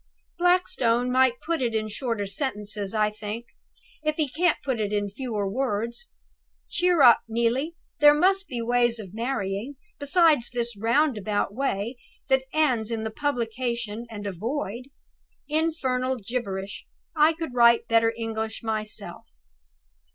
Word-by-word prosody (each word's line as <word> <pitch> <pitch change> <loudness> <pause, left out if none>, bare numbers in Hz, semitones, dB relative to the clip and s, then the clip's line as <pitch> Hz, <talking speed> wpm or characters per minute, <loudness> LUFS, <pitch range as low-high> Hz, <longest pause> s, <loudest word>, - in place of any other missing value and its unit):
"Blackstone 250 -9 +2
might 255 -1 +3
put 330 -2 -1
it 235 -3 0
in 215 0 0
shorter 225 -1 -2
sentences, 205 -2 -3
I 210 -1 +2
think, 215 +2 -6 0.6
if 305 0 0
he 310 -2 +1
can't 340 +6 +1
put 260 -4 -1
it 205 -1 -1
in 205 -1 0
fewer 215 -3 -3
words. 235 - -2 0.6
Cheer 355 -4 +3
up, 240 -3 +8
Neelie! 235 +8 0 0.2
there 295 0 +8
must 385 +5 +3
be 245 -5 -4
other - - -4
ways 240 0 +2
of 200 -4 -9
marrying, 230 +1 -3 0.2
besides 295 -3 +3
this 235 -1 -2
roundabout 220 -3 +1
way, 235 -2 -2 0.3
that 265 0 +3
ends 255 -8 +2
in 225 -1 -3
a 220 - -3
Publication 235 -3 -2
and 205 -2 -7
a 200 - -2
Void. 235 - -4 0.6
Infernal 265 -5 0
gibberish! 200 -4 -4 0.3
I 310 +1 +5
could 320 -5 -6
write 235 -1 +5
better 230 -1 +4
English 220 -1 -4
myself." 215 -1 -3
235 Hz, 140 wpm, -26 LUFS, 215-275 Hz, 0.6 s, up